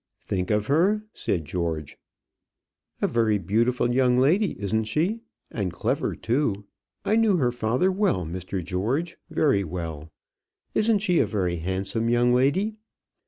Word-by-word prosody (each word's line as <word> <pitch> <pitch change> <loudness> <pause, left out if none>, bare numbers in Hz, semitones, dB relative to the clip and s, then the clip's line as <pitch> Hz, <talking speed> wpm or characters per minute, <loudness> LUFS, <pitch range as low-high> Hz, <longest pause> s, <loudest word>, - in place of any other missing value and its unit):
"Think 90 -2 -2
of 105 -1 +1
her!" 185 - +2
said 85 -5 -2
George. 80 -2 -3 1.0
"A - - +4
very 110 -3 +2
beautiful 115 +6 +1
young 125 -1 +3
lady; 170 +10 +2
isn't 110 +2 0
she? 170 - 0 0.3
and 100 -5 -2
clever, 85 - -1
too. 115 -5 -1 0.4
I 215 - +2
knew 220 -4 +4
her 125 -6 +2
father 125 +9 +1
well, 185 - +1
Mr. 90 +2 -4
George 120 - -2
very 145 -10 +2
well. 80 -3 -6 0.6
Isn't 215 -2 +2
she 180 -5 +3
a - - +3
very 90 -5 -1
handsome 95 +6 -2
young 120 +1 +3
lady? 180 - +2
115 Hz, 140 wpm, -25 LUFS, -, 1.0 s, A